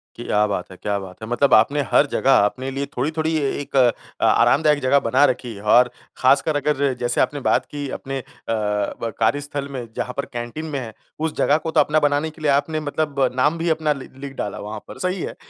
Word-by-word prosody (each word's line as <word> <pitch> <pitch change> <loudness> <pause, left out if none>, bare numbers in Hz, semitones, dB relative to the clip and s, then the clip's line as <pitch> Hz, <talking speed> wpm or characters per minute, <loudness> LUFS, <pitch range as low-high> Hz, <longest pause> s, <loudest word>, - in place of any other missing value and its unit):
क्या 105 -3 +1
बात 95 -2 -4
है! 95 - -11
क्या 105 +1 -2
बात 95 0 -11
है! - - -5
मतलब 130 +3 +2
आपने 130 +7 +4
हर - - +5
जगह 135 - +2
आपने 130 +3 +2
लिए 135 +1 -3
थोड़ी-थोड़ी 155 +4 0
एक 145 -1 -3
अ, 125 -3 +1
आरामदायक 150 -1 +4
जगह 130 +2 +4
बना 130 +3 +2
रखी 125 -2 -7
है। 100 - -10
और 120 +4 +5 0.3
खासकर 140 +4 +3
अगर 145 -2 +1
जैसे 120 0 +1
आपने 145 +3 0
बात - - +2
की 145 -1 -4
अपने 135 0 -4
अ, - - -9 0.3
ब 105 +1 -2
कार्यस्थल 145 +4 0
में 130 -3 -5
जहाँ 125 - -3
पर 140 - -1
कैंटीन 120 +6 -5
में 150 -3 -3
है 115 -4 -7 0.3
उस 160 0 -2
जगह 145 - +3
को 160 +1 -4
तो 160 - +3
अपना 150 +1 +3
बनाने 145 +1 +1
के 155 +1 -16
लिए 150 -2 +2
आपने 145 +3 +1
मतलब 150 -1 -3 0.2
नाम 150 +5 +2
भी 170 +1 -1
अपना 160 -1 +1
लि 135 -2 -10
लिख 140 0 -7
डाला 105 - -4
वहाँ 105 +1 -6
पर, - - -10
सही 185 0 -1
है। - - -5
140 Hz, 220 wpm, -21 LUFS, 120-150 Hz, 0.3 s, हर